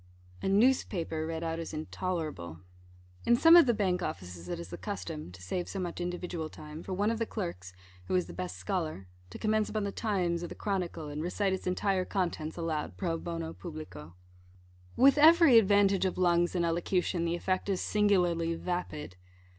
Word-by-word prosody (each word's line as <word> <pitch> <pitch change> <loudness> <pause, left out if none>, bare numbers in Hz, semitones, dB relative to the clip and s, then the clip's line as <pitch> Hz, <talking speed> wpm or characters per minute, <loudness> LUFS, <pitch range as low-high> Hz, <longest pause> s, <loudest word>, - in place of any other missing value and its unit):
A - - -1
newspaper, 195 -8 +2
read 165 0 -4
out, 165 0 -2
is 165 -1 -5
intolerable. 155 - -4 0.6
In 235 - +4
some 330 +7 +7
of 340 -5 +8
the 240 - +4
Bank 185 -3 0
offices 90 - -6
it 90 - -3
is 85 +1 -7
the 85 - -6
custom 165 - -5
(to 90 0 -13
save 175 - -3
so - - -5
much 175 -1 -4
individual 175 -2 -4
time) 155 +1 -9
for 190 - -8
one 205 +4 +1
of 230 - -2
the 230 - +1
clerks 90 +2 -5 0.3
who 90 - -1
is 90 -2 +2
the 85 - -10
best 90 +1 -5
scholar 155 - -3 0.2
to - - -8
commence 215 0 +1
upon 215 -1 -2
the 200 - -2
Times, 180 -6 -1
or - - -3
the - - -9
Chronicle, 180 -6 -3
and 145 +1 -4
recite 190 +3 0
its 190 - -4
entire 185 +1 +1
contents 175 -5 -2
aloud 160 -3 -3
pro 170 -4 -1
bono 165 -1 -4
publico. 155 - -9 0.8
With 275 +2 +5
every 320 -5 +8
advantage 200 -2 +3
of 185 - -1
lungs 175 -1 +2
and 175 -1 +2
elocution, 175 +1 0
the 170 0 0
effect 185 +3 -1
is 190 -2 +1
singularly 175 -5 +2
vapid. 165 - -4
175 Hz, 185 wpm, -30 LUFS, 155-195 Hz, 0.8 s, of